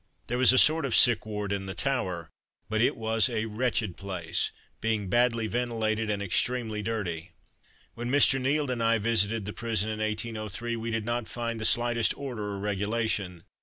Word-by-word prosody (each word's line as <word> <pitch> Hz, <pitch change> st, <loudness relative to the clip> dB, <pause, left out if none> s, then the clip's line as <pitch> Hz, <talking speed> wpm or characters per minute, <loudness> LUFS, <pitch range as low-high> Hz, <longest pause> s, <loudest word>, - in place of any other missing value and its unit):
There 120 Hz, +1 st, -2 dB
was 130 Hz, -, +7 dB
a 130 Hz, -, +3 dB
sort 155 Hz, +4 st, +6 dB
of 135 Hz, -4 st, 0 dB
sick 120 Hz, -4 st, +5 dB
ward 105 Hz, -2 st, -4 dB
in 100 Hz, -1 st, -2 dB
the 95 Hz, -, -5 dB
Tower, 95 Hz, -, -2 dB, 0.4 s
but 110 Hz, 0 st, 0 dB
it 120 Hz, -, +2 dB
was 110 Hz, +1 st, +2 dB
a 110 Hz, -2 st, -1 dB
wretched 110 Hz, -3 st, -1 dB
place, 90 Hz, -4 st, -2 dB, 0.3 s
being 110 Hz, -3 st, -1 dB
badly 120 Hz, 0 st, +2 dB
ventilated 110 Hz, -2 st, -1 dB
and 100 Hz, -1 st, -1 dB
extremely 110 Hz, +2 st, 0 dB
dirty. 90 Hz, -6 st, -4 dB, 0.6 s
When 120 Hz, +1 st, -5 dB
Mr. 135 Hz, -1 st, +4 dB
Nield 140 Hz, +1 st, 0 dB
and 120 Hz, -2 st, -2 dB
I 115 Hz, 0 st, +3 dB
visited 110 Hz, -1 st, +1 dB
the 105 Hz, -, -5 dB
prison 110 Hz, -2 st, -1 dB
in 110 Hz, -, -5 dB
1803, 110 Hz, +1 st, -3 dB
we 115 Hz, 0 st, -4 dB
did 115 Hz, -2 st, -2 dB
not 120 Hz, -1 st, -2 dB
find 115 Hz, -1 st, -4 dB
the -, -, -2 dB
slightest 120 Hz, 0 st, +2 dB
order 110 Hz, -8 st, -5 dB
or -, -, -5 dB
regulation. 100 Hz, -3 st, -2 dB
110 Hz, 180 wpm, -28 LUFS, 105-120 Hz, 0.6 s, was